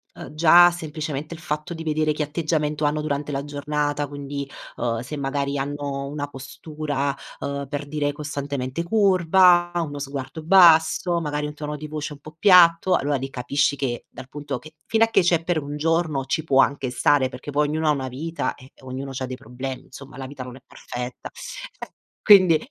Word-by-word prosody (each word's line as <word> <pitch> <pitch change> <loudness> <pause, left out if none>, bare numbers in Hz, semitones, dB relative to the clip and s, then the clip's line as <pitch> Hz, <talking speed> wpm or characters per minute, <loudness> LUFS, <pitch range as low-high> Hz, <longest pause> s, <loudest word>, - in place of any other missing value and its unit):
uhm, - - -9
già 175 +2 +7
semplicemente 155 -2 -5
il - - -12
fatto 155 +1 -4
di 165 - -7
vedere 155 0 +1
che 150 0 -1
atteggiamento 150 0 -1
hanno 150 +1 +1
durante 145 -1 -3
la 140 0 -3
giornata, 145 0 -2
quindi, 140 0 -6 0.3
uhm, 115 -1 -1
se 125 +5 -6
magari 140 0 -2
hanno 140 0 -3
una 145 0 -4
postura, 145 0 -4 0.2
ehm, 140 0 -4
per 145 -1 -4
dire 145 -1 -1
costantemente 140 -1 -4
curva, 180 -3 +4
uno 150 -4 -2
sguardo 140 +2 -6
basso, 170 0 +5
magari 150 -1 -2
un 150 - -5
tono 150 0 -5
di 150 +1 -7
voce 150 0 -5
un 145 - -13
po' 155 +1 -13
piatto, 180 -1 +6
allora 145 +1 0
lì 135 +1 -5
capisci 140 +3 0
che, 125 -3 -3
dal 130 - -11
punto 145 -1 -5
che 155 0 -14
fino 225 0 +3
a 225 - +4
che 225 - +3
c'è 170 -2 +2
per 170 -4 0
1 145 +1 -5
giorno 160 -3 0
ci 160 +4 -1
può 135 -3 +4
anche 140 -2 -2
stare, 130 +1 +3
perché 145 - -8
poi 145 +1 +2
ognuno 155 +1 -1
ha - - +5
una 135 -3 -2
vita 160 +6 -3
e 130 +1 -16
ognuno 130 +1 -6
c'ha 130 0 -3
dei 130 0 -6
problemi, 130 +3 -7
insomma 135 0 -12
la 135 -1 -6
vita 135 -1 -8
non 125 0 -9
è - - -18
perfetta. 125 +1 -7 0.5
E - - -6 0.3
quindi, 185 -6 +7
145 Hz, 195 wpm, -23 LUFS, 140-160 Hz, 0.5 s, già